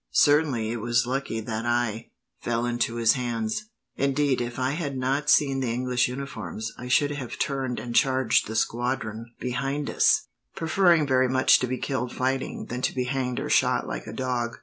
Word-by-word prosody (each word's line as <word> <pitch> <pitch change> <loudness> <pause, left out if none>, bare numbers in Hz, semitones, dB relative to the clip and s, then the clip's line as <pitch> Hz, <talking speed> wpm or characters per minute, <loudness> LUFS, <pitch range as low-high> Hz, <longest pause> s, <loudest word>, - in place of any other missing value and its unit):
"Certainly, 145 -7 +3
it 120 - -3
was 120 +1 +2
lucky 130 -3 -2
that 110 0 -4
I 120 -2 -1 0.3
fell 120 0 -1
into 120 -1 -1
his 115 -1 +4
hands. 120 - -3 0.3
Indeed, 140 -1 +1
if 120 0 -4
I 130 +1 0
had 145 -3 -3
not 135 +3 0
seen 135 -3 +4
the 130 -3 -1
English 125 0 +1
uniforms, 110 -6 -5
I 125 - -8
should 145 +3 +3
have 140 -4 -5
turned 135 -4 -2
and 120 +2 -6
charged 130 -2 +3
the 110 - -5
squadron 115 -1 -2
behind 135 +3 -2
us; 215 - +3 0.3
preferring 170 -1 +3
very 130 -2 +2
much 130 0 +5
to 125 - -1
be 130 +1 -2
killed 130 -3 -2
fighting, 130 +1 -2
than 125 +1 -5
to - - -1
be 125 - 0
hanged 125 -1 -2
or - - -3
shot - - +3
like - - -5
a - - -6
dog." 125 -2 -2
125 Hz, 185 wpm, -26 LUFS, 120-135 Hz, 0.3 s, much